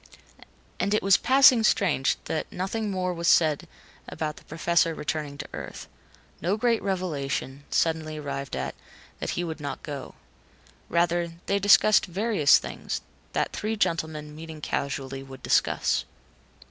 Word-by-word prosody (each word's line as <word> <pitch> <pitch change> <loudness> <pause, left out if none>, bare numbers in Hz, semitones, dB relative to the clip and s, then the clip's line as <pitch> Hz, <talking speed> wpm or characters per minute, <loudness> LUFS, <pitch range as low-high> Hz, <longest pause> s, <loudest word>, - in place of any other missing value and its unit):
And 200 +3 +1
it - - 0
was 195 -1 +6
passing 265 -2 +6
strange 180 -10 +2
that 160 - -3
nothing 205 +4 -2
more 185 -2 -1
was 170 0 -3
said 155 -4 +4 0.4
about 150 -1 -4
the - - -14
Professor 165 +1 +1
returning 150 -2 -3
to - - -6
Earth. - - -7 0.5
No 185 +6 +1
great 230 0 +2
revelation, 145 -7 -3
suddenly 160 -1 0
arrived 140 -2 -4
at, 65 0 -3 0.5
that - - -3
he 175 - 0
would 160 -2 -5
not 145 -1 -5
go. 140 -3 -7 0.7
Rather, 170 0 +1
they 200 - +1
discussed 205 +1 +5
various 190 -5 +4
things, - - -5 0.3
that - - 0
three 215 +1 -2
gentlemen, 160 -5 -2
meeting 160 0 -9
casually, 135 -2 -3
would 135 -1 -12
discuss. - - +2
165 Hz, 140 wpm, -26 LUFS, 150-195 Hz, 0.7 s, was